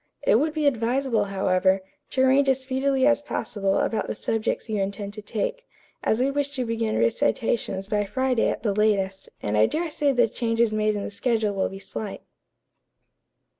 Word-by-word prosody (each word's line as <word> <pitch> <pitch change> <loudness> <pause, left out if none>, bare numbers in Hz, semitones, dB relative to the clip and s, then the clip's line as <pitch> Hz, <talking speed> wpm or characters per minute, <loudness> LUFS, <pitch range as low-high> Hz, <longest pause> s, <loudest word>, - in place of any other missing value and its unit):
It - - +4
would 310 0 0
be 305 -1 0
advisable, 245 -3 +1
however, 190 -1 +1 0.3
to 260 - 0
arrange 270 +1 +4
as 265 0 +1
speedily 265 0 +1
as 290 0 +4
possible 195 -8 -1
about 225 - 0
the - - -3
subjects 225 +2 -2
you 215 -3 -1
intend 200 +1 -4
to 210 - -7
take, - - -3 0.4
as 220 - +1
we 265 +2 +2
wish 285 0 -2
to 255 -2 -1
begin 225 -1 -1
recitations 190 - 0
by 210 0 0
Friday 255 +2 +1
at - - -4
the 210 -4 +1
latest, 195 -2 0
and 105 0 -1
I 105 +1 +5
dare 330 0 -2
say 290 -1 +1
the 245 -3 +3
changes 230 0 0
made 215 0 +1
in 205 - -3
the - - -5
schedule 220 -1 0
will 195 -1 0
be 195 - -8
slight." 200 +1 -6
225 Hz, 185 wpm, -25 LUFS, 200-265 Hz, 0.4 s, I